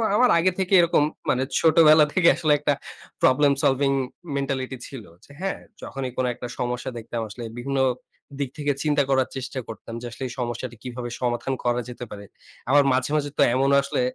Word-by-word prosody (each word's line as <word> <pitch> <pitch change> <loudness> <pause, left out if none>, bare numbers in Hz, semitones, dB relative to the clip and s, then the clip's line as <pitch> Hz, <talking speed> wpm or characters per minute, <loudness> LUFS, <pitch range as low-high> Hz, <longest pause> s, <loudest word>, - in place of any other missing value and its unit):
আমার 250 +2 +5
আগে 185 +2 +3
থেকেই 190 0 +4
এরকম, 165 -3 +3 0.3
মানে 130 +1 +2 0.2
ছোটবেলা 155 -1 +6
থেকে 175 -3 +3
আসলে 155 -2 0
একটা 145 0 +1 0.5
প্রবলেম 140 +2 +4
সলভিং 135 0 +3 0.5
মেন্টালিটি 135 -1 -2
ছিল। 130 -5 -9 0.2
যে - - -18
হ্যাঁ, 195 0 -2 0.2
যখনই 130 -2 -5
কোনো 130 -1 +1
একটা 120 - -7
সমস্যা 125 +1 -2
দেখতাম, 115 +1 -5
আসলে 120 +3 -8 0.2
বিভিন্ন 135 +2 -2 0.6
দিক 140 -3 -1
থেকে 145 -1 0
চিন্তা 150 -2 +2
করার 130 -1 +2
চেষ্টা 130 0 -4
করতাম 115 +1 -9
যে - - -7
আসলে 125 - -7
এই 120 - -7
সমস্যাটা 120 0 -4
কিভাবে 125 -1 -5
সমাধান 125 +2 -1
করা 120 0 +1
যেতে 125 0 -7
পারে? 100 0 -8 0.4
আবার 145 +1 +6
মাঝে, 130 +3 0
মাঝে 145 -1 0
তো - - +3
এমন 135 +1 +2
আসলে 140 - -2
135 Hz, 180 wpm, -24 LUFS, 125-145 Hz, 0.6 s, ছোটবেলা